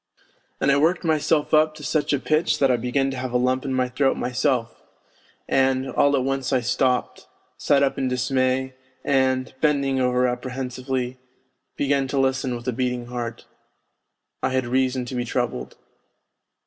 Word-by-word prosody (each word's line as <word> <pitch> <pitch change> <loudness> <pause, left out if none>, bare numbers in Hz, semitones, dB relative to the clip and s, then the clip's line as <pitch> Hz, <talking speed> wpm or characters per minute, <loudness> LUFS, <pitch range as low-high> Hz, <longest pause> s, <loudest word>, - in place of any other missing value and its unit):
' - - -41
And 140 - +3
I 140 - +4
worked 165 +6 +2
myself 155 -1 +1
up 155 0 +4
to 150 - -11
such 145 +2 0
a 145 - +3
pitch 155 +4 +1
that 135 -2 +3
I - - +3
began 125 +3 0
to 135 - -5
have 130 -1 -4
a - - +4
lump 130 +1 0
in 135 - -2
my 130 -1 +1
throat 135 +2 +1
myself, 125 -1 -1 0.7
and... 130 0 +2
and - - -6
all 145 0 +3
at 130 - +1
once 135 0 -1
I 130 - +3
stopped, 125 +1 0 0.3
sat 140 -1 +2
up 140 0 0
in 135 - 0
dismay, 130 +1 0 0.3
and 130 -1 +1
bending 140 -3 +2
over 125 0 +2
apprehensively, 125 0 -3 0.6
began 140 -1 +1
to 140 +1 -1
listen 130 -1 0
with 120 +1 -8
a 125 - 0
beating 125 0 -2
heart. 120 -1 -5 1.0
I - - +1
had 130 -1 0
reason 130 0 0
to 125 - -7
be 125 -1 -1
troubled. 120 - -3
130 Hz, 175 wpm, -23 LUFS, 125-140 Hz, 1.0 s, I